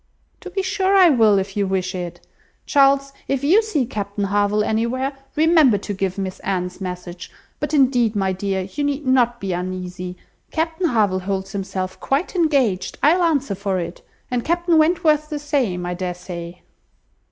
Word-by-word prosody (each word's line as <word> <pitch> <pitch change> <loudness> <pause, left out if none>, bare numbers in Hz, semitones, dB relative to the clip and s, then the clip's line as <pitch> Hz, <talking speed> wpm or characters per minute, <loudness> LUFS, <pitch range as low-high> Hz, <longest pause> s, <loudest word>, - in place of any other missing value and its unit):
"To 375 - -9
be 385 +1 -2
sure 385 0 +1
I 370 -3 +7
will, 220 -7 +4
if 195 0 -2
you 200 -1 0
wish 190 0 -1
it. 175 -2 -6 0.4
Charles, 275 0 +3
if 275 0 -1
you 360 +10 +5
see 370 - -1
Captain 205 -3 -4
Harville 205 +1 +1
anywhere, 235 +6 -1 0.2
remember 310 -7 +5
to 205 +1 -5
give 190 -1 -2
Miss 190 -1 -4
Anne's 180 0 -3
message. 180 -1 -6 0.3
But 295 -1 -3
indeed, 250 -6 +3
my 190 -2 +1
dear, 190 0 -2
you 235 +10 -4
need 285 0 -1
not 245 -2 +2
be 195 -2 -3
uneasy. 180 0 -5 0.3
Captain 325 +2 -1
Harville 210 - +2
holds 190 0 -3
himself 190 -1 -4
quite 285 +8 -1
engaged, 275 - +1
I'll 330 +6 +5
answer 285 -9 +1
for 195 0 -2
it; 170 0 -5 0.3
and 245 -1 0
Captain 345 0 +2
Wentworth 310 -2 +2
the 300 - -3
same, 265 - -1
I 175 - -2
dare 180 0 -3
say." 175 -1 -8
220 Hz, 170 wpm, -21 LUFS, 190-295 Hz, 0.4 s, I